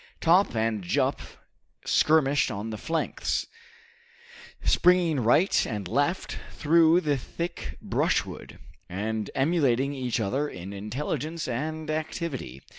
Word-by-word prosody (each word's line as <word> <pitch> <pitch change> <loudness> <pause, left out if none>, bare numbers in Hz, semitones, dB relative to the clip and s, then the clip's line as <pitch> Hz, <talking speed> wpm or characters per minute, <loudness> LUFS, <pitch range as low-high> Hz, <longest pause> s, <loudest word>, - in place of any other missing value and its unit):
Top 175 -3 +4
and 110 -1 0
Jup 90 - 0 0.6
skirmished 145 -2 +3
on 110 +1 -4
the 110 - -4
flanks, 165 0 -1 1.2
springing 175 -4 +4
right 125 - +3
and 105 -5 -4
left 145 - -1
through 165 +2 +4
the 145 -4 +1
thick 170 +7 -6
brushwood, - - -1 0.3
and 105 +3 -3
emulating 140 -3 +2
each 125 -4 -2
other 135 +8 -1
in 95 +2 -8
intelligence 150 +10 -4
and 155 +6 -3
activity. 155 - -4
140 Hz, 110 wpm, -27 LUFS, 110-160 Hz, 1.2 s, Top